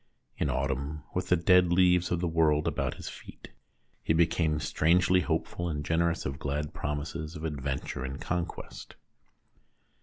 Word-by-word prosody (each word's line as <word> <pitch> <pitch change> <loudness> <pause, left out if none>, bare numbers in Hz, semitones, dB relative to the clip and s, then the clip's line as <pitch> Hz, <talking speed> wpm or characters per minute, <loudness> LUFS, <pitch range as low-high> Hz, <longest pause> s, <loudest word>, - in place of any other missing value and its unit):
In - - -1
autumn, 70 +2 -2
with 90 0 -2
the 90 - +6
dead 90 0 +4
leaves 90 0 +4
of 85 -1 0
the 90 - +1
world 80 -2 +2
about - - -1
his - - -9
feet, - - -10 0.5
he - - +1
became 80 -2 +2
strangely 90 +5 +3
hopeful 85 0 -2
and 75 -2 -3
generous 85 +1 +1
of 70 +2 -4
glad 75 0 -3
promises 75 +2 -4
of 80 - -7
adventure 70 -4 -3
and 65 +2 -5
conquest. 90 -1 -5
80 Hz, 150 wpm, -29 LUFS, 75-85 Hz, 0.5 s, the